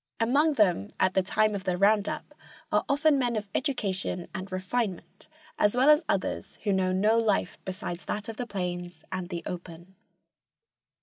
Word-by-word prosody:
Among 280 +7 +3
them 180 - +2
at 185 0 +3
the 190 - +3
time 215 +3 +2
of 200 -2 -4
the 180 -2 0
"round 205 +1 +4
up" - - -6 0.4
are 210 - +3
often 285 0 +3
men 240 -2 0
of 210 -1 -3
education 195 -9 -1
and 190 +1 -6
refinement, 185 +1 -3 0.3
as 210 +3 +3
well 270 +4 +7
as 300 +2 +5
others - - -2
who 205 - +1
know 185 -1 +1
no 210 +5 +3
life 215 -3 0
besides 185 -2 -5
that 210 +1 -3
of 225 -1 -6
the 245 - -3
plains 180 -4 -4
and 185 -1 -4
the 170 -2 -4
open. 175 0 -8
200 Hz, 175 wpm, -28 LUFS, 185-230 Hz, 0.4 s, well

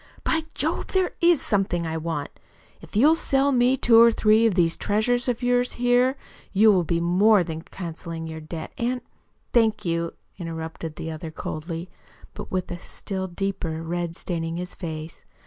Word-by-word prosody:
"By 320 - +1
Jove, - - -1
there 375 -1 +1
IS 340 -3 +4
something 195 -5 0
I 160 0 -3
want. 160 -2 -3 0.5
If - - -13
you'll 285 +9 +6
sell 280 -3 +2
me 250 0 +3
two 230 -2 +6
or 235 0 +8
three 220 +1 +4
of 210 - 0
these 165 -3 +3
treasures 240 +4 0
of 245 0 -1
yours 245 0 +2
here, 245 +2 +2 0.3
you 215 +2 +6
will 185 -3 +3
be 170 0 0
more 185 +4 +4
than 160 -1 -5
cancelling 165 -2 -6
your 160 0 -6
debt, 160 +1 -7
and 250 +1 -1 0.3
" - - -43
"Thank 225 -4 +3
you," 170 0 -1 0.3
interrupted 160 -1 -6
the 160 - -5
other 160 +1 -6
coldly, 165 +2 -5 0.5
but - - -8
with 185 -1 -2
a 175 - -5
still 190 +1 -5
deeper 175 -3 -3
red 170 0 -3
staining 165 -2 -3
his 180 +1 -5
face. 160 -2 -7
180 Hz, 175 wpm, -24 LUFS, 165-235 Hz, 0.5 s, or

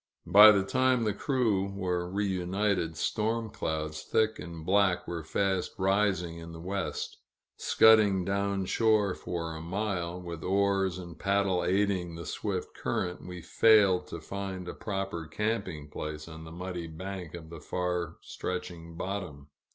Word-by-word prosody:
By 105 +5 +10
the 100 -2 +3
time 130 +1 +2
the 105 -2 +1
crew 105 -6 0
were 90 -2 -1
reunited, 95 -3 0
storm 110 +3 -1
clouds, 80 -1 -3
thick 110 0 +1
and 85 -2 -8
black, 95 -1 +2
were 85 -2 -4
fast 95 +3 0
rising 95 -3 +1
in 85 0 -9
the 80 - -8
west. 95 +3 -3 0.4
Scudding 105 -4 +5
down 100 0 0
shore 110 -2 +3
for 85 -3 -4
a 80 - -7
mile, 90 -1 -2
with 85 -2 -7
oars 95 -1 +1
and 85 -3 -9
paddle 100 -2 +1
aiding 95 -2 +1
the 85 - -7
swift 95 -4 -3
current, 90 -1 -3
we 90 -2 -7
failed 105 -5 +5
to 85 - -6
find 95 +1 -5
a - - -4
proper 95 -5 -4
camping 95 -5 -2
place 75 +1 -6
on 80 0 -9
the 80 - -10
muddy 90 0 -5
bank 90 +1 -7
of 80 -1 -10
the 85 -3 -9
far 90 -1 -2
stretching 85 -2 -5
bottom. 90 -8 -5
95 Hz, 150 wpm, -29 LUFS, 85-100 Hz, 0.4 s, By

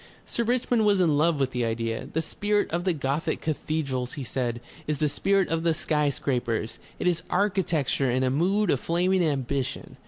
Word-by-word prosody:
Sir 235 - -1
Richmond 240 -1 +1
was 205 -2 +4
in 165 -5 +3
love 155 +1 +2
with 135 -1 0
his 125 -1 0
idea. 115 0 -2
"The 160 - -1
spirit 205 +5 0
of 175 +2 -1
the 185 - +2
Gothic 145 +1 -1
cathedrals," 140 -5 -2
he 140 - -5
said, 120 -1 -2 0.3
"is 150 -1 0
the 150 - +1
spirit 195 +6 +1
of 165 0 0
the 165 -1 +2
sky 150 -1 +1
scrapers. 120 -5 -2 0.2
It - - -4
is 175 -2 +2
architecture 175 -9 +1
in 130 +2 +1
a 130 - +2
mood 185 +7 +2
of 135 - +1
flaming 180 +4 +1
ambition. 140 -3 -2
155 Hz, 190 wpm, -26 LUFS, 130-180 Hz, 0.3 s, was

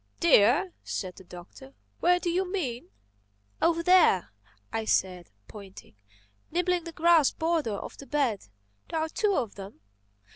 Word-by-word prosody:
"Deer!" 300 - +4
said 185 -2 -5
the - - -14
Doctor. 180 +10 -13 0.2
"Where 355 +1 +3
do 350 -1 -2
you 365 +1 -1
mean?" 260 -12 -4 0.7
"Over 335 0 +2
there," 335 - +4 0.4
I 225 - -1
said, 180 -4 -1 0.2
pointing—"nibbling 190 - -6
the 335 - -7
grass 330 -2 +4
border 320 -9 -1
of - - -9
the 275 - -11
bed. 270 -9 -1 0.4
There 325 - -2
are 320 0 -2
two 405 +3 0
of 230 - -2
them." 195 - -11
275 Hz, 140 wpm, -27 LUFS, -, 0.7 s, Deer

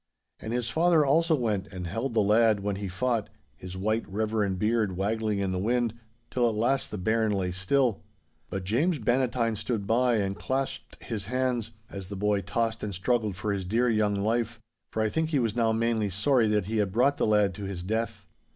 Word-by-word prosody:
And 110 - -6
his 120 -1 -1
father 165 +2 +3
also 160 +4 +3
went 105 -7 -1
and 90 -2 -7
held 115 +8 -3
the 110 - +4
lad 110 0 +4
when 100 -1 -2
he 100 0 -4
fought, 110 +4 -1 0.3
his 90 0 -8
white, 110 +4 0
reverend 105 -1 0
beard 105 -2 +1
waggling 105 +1 0
in 100 -1 -1
the 90 - -1
wind, 120 +2 +1 0.4
till 120 -2 +2
at 110 - -3
last 125 +5 +1
the 105 - -5
bairn 110 +3 +1
lay 95 -3 -1
still. 100 +2 +1 0.5
But 95 0 -4
James 145 - +1
Bannatyne 120 -1 +1
stood 110 0 -3
by 120 +3 +3
and 100 -2 0
clasped 135 +4 -3
his 110 -6 -4
hands, 125 -1 -1 0.2
as 95 -3 -8
the 100 - -6
boy 105 0 +1
tossed 115 +3 -2
and 100 -3 -3
struggled 110 +1 0
for 105 +2 -2
his 95 -1 -2
dear 115 +6 +1
young 105 -2 +2
life, 115 +3 -1 0.3
for 110 - 0
I 110 - +1
think 160 +6 -1
he 155 - +1
was 115 -5 0
now 115 -2 +2
mainly 110 -2 +1
sorry 110 +5 +2
that 105 -2 +1
he 110 +3 -2
had 100 -3 +1
brought 130 +7 +3
the - - +1
lad 105 -3 +3
to 100 +1 -6
his 95 -3 -5
death. 110 +4 -2
110 Hz, 205 wpm, -28 LUFS, 100-120 Hz, 0.5 s, the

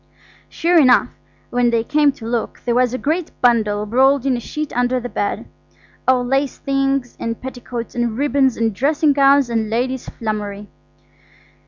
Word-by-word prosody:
Sure 340 +1 +2
enough, 255 -4 +5 0.4
when 245 0 +2
they 230 -1 +1
came 295 +3 +2
to 230 - -12
look, 230 0 -3
there 240 - +1
was 250 0 +2
a 255 - -2
great 315 +5 -1
bundle 215 -4 +2
rolled 265 +4 +3
in 265 -2 +2
a - - -3
sheet 300 +4 -5
under 245 +1 +1
the 245 - -5
bed–all 250 +4 -3
lace 270 +2 0
things 275 -2 -1
and 230 0 -4
petticoats 245 -2 -7
and 240 -2 -2
ribbons 275 -2 +1
and 225 -1 0
dressing 290 +6 +2
gowns 275 -1 +4
and 225 -2 -1
ladies' 250 +3 -2
flummery. 210 -2 -5
250 Hz, 160 wpm, -19 LUFS, 230-275 Hz, 0.4 s, enough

